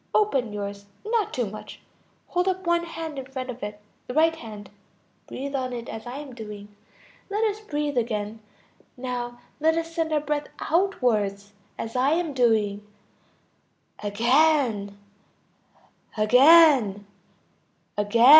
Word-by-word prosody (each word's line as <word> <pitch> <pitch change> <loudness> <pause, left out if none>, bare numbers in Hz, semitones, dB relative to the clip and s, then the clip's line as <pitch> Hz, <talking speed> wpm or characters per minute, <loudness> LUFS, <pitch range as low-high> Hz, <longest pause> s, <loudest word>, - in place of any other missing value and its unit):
Open 275 - +2
yours. 200 -1 -5 0.2
Not 445 -1 +1
too 245 - -1
much! 215 +1 -9 0.5
Hold 360 +1 +1
up 375 0 -1
one 340 0 +2
hand 325 -3 -5
in 260 - -7
front 260 -1 -5
of 250 - -11
it, 210 0 -5 0.3
the 250 - -5
right 325 +1 +4
hand. 210 -8 -10 0.6
Breathe 275 +2 -5
on 255 -2 -2
it 235 -1 -5
as 220 +2 -7
I 250 +3 -5
am 285 -3 -8
doing. 210 -3 -9 0.5
Let 415 +2 0
us 430 -1 0
breathe 295 - -1
again; 220 -2 -3 0.6
now 245 -1 -4 0.2
let 320 +2 +3
us 330 0 -3
send 325 -1 -1
our 305 - +3
breath 295 0 -2
outwards, 215 - 0 0.2
as 225 +1 -5
I 265 +4 +3
am 330 -3 0
doing. 220 -5 +2 1.2
Again... 230 -1 +2 1.2
again... 250 -3 +6 0.9
again. 210 +3 +3
255 Hz, 135 wpm, -25 LUFS, 215-320 Hz, 1.2 s, again